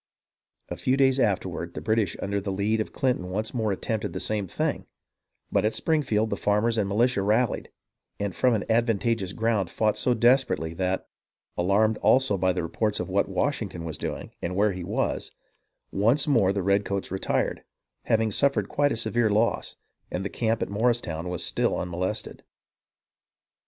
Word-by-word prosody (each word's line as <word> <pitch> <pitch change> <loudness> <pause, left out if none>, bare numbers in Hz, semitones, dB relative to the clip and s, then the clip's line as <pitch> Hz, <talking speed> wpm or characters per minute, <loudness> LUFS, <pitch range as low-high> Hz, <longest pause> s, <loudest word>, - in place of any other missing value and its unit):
A - - -5
few 130 +1 +1
days 135 -1 +3
afterward, 90 -6 -1
the - - -3
British 110 -4 0
under 100 +1 -1
the 100 0 -3
lead 105 +3 0
of - - -5
Clinton 125 -9 -1
once 110 +4 -2
more 110 -4 0
attempted 105 +2 -3
the - - -3
same 105 -3 -1
thing; - - -2 0.6
but - - +2
at 110 +1 +1
Springfield 115 -9 +1
the - - +1
farmers 105 +3 +1
and 100 -2 0
militia 115 +1 +2
rallied, 110 +4 +1 0.5
and 100 -3 -2
from 125 -2 +3
an 105 - -2
advantageous 115 -3 +1
ground 110 -4 0
fought 105 +5 0
so 125 - +2
desperately 120 -8 +2
that, 95 +2 -2 0.5
alarmed 105 +5 +2
also 130 -6 +4
by 95 0 +2
the 90 -1 -2
reports 105 +6 -1
of - - -3
what 100 +1 +1
Washington 95 -4 -2
was 80 -2 -5
doing - - -5
and 90 +1 -3
where 105 +2 +3
he 90 -1 -5
was, - - -2 0.6
once 115 +10 +2
more 115 -10 +4
the 100 -1 -2
redcoats 100 0 0
retired, 95 - -1 0.4
having 110 -1 +2
suffered 115 -4 +2
quite 145 0 +2
a - - -1
severe 120 0 +2
loss, 110 +3 +1 0.3
and 95 +2 -3
the - - -1
camp 115 +1 0
at - - -5
Morristown 100 -6 0
was 90 -1 -1
still - - 0
unmolested. 90 +5 -3
105 Hz, 170 wpm, -26 LUFS, 95-115 Hz, 0.6 s, also